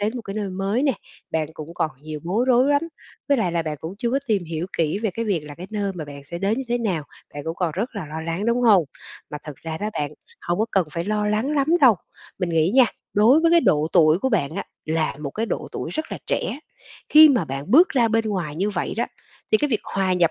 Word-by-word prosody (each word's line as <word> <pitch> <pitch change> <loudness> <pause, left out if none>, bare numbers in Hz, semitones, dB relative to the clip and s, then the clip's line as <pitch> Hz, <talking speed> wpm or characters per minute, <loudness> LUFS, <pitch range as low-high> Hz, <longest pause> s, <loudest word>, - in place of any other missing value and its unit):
đến 210 +2 0
một 235 - -5
cái 195 -1 -7
nơi 205 -2 -2
mới 195 +7 -1
nè, 275 -3 +3 0.4
bạn 160 -1 0
cũng 155 +2 -9
còn 155 - 0
nhiều 155 -1 -6
bối 200 +9 0
rối 250 +1 +5
lắm, 285 +2 +3 0.5
với 280 - +4
lại 185 -8 0
là 170 -1 0
bạn 155 -2 -4
cũng 165 +4 -6
chưa 235 0 -1
có 270 - +2
tìm 205 -6 +1
hiểu 165 +2 -4
kỹ 165 +4 +1
về 220 -2 -1
cái 230 +5 -3
việc 195 -7 0
là 145 -1 -9
cái 180 +4 -9
nơi 200 -2 -2
mà 160 -3 -5
bạn 140 -1 -10
sẽ 170 +4 -6
đến 205 +6 0
như 270 - -3
thế 240 0 +1
nào, 190 -9 -1 0.3
bạn 145 - -6
cũng 165 +1 -3
còn 175 -3 0
rất 220 +8 -2
là 180 -6 -4
lo 155 +2 -6
lắng, 165 +6 -3
đúng 235 +1 +2
hông? 200 -8 +6 0.5
Mà 150 - -5
thật 150 -3 -8
ra 160 -1 -6
đó 210 +1 -2
bạn, 145 -1 -2 0.3
hông 175 +2 -2
có 220 - +3
cần 190 -4 +2
phải 170 0 -3
lo 210 0 0
lắng 215 +6 0
lắm 275 0 +2
đâu. 250 -6 +7 0.4
Mình 180 -2 -1
nghĩ 165 +2 +2
nha, 260 -2 +8 0.3
đối 235 +9 +5
với 330 - +3
cái 340 0 +6
độ 150 - +3
tuổi 160 -1 +5
của 265 - 0
bạn 170 - 0
á - - -3 0.2
là 160 -2 -1
một 140 -2 -4
cái 225 +7 -2
độ - - -3
tuổi - - -4
rất 315 +1 -4
là - - -4
trẻ, 275 - -1 0.5
khi 310 +1 +9
mà 245 - +2
bạn 140 +5 -6
bước 340 +8 +7
ra 240 -4 +2
bên 225 0 +1
ngoài 175 -8 -2
như 200 +4 0
vậy 175 -3 -3
đó, 235 - 0 0.4
thì 215 - +5
cái 295 - +1
việc 220 - +1
hòa 190 -1 0
nhập 175 -2 +3
195 Hz, 270 wpm, -23 LUFS, 160-230 Hz, 0.5 s, khi